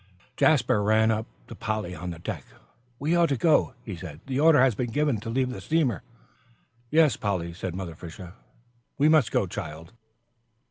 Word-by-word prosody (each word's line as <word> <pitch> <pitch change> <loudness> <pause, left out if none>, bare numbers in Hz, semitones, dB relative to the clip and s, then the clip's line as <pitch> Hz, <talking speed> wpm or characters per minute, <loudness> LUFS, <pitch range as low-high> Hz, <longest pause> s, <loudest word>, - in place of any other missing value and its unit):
Jasper 125 -7 +3
ran 110 +2 +3
up 110 0 -2 0.2
to - - -9
Polly 110 -4 -3
on 90 +1 -6
the 85 - -6
deck. 80 - -5 0.5
"We 155 +6 0
ought 170 -2 +4
to 140 - 0
go," 150 -3 +3
he 105 - -5
said, 80 -3 -9
"the 135 0 -2
order 155 -1 +6
has 130 -1 +5
been 120 +3 -3
given 145 -1 0
to 115 +2 -7
leave 130 +2 0
the - - -7
steamer." 155 -6 0 0.9
"Yes, 155 -5 +4
Polly," 90 -5 -2
said 90 0 -5
Mother 90 -3 -5
Fisher, 85 +2 -10 0.6
"we 145 - +4
must 155 -8 +4
go, - - +2
child." 80 0 -7
110 Hz, 180 wpm, -26 LUFS, 90-140 Hz, 0.9 s, order